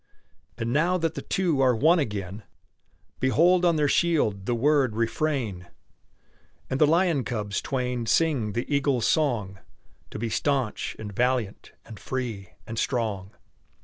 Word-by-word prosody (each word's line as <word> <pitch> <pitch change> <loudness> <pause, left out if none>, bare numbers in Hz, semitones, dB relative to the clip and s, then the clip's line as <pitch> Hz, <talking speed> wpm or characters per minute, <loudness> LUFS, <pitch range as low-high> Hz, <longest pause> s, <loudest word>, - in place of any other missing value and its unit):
And 115 0 -2
now 170 +5 +2
that 165 -2 -1
the - - -5
two 175 -8 0
are 130 -2 +4
one 160 +9 +4
again, 105 - -4 0.8
Behold 170 +7 +3
on 170 -2 +4
their 150 -1 +2
shield 140 - +1
the 120 - +1
word 135 -2 +2
"Refrain!" 115 - -2 1.0
And 130 - -1
the 150 - +7
lion 165 -3 +2
cubs 105 -5 -3
twain 125 -3 -2
sing 125 -4 +1
the 120 +3 -2
eagle's 140 -4 +1
song: 115 - 0 0.5
"To - - -7
be 115 +2 -2
stanch, 135 -5 -1
and 105 -2 -7
valiant, 125 -2 -1
and 110 -3 -11
free, 115 -7 -4 0.2
and 115 0 -5
strong!" 105 -6 -2
125 Hz, 145 wpm, -26 LUFS, 110-150 Hz, 1.0 s, the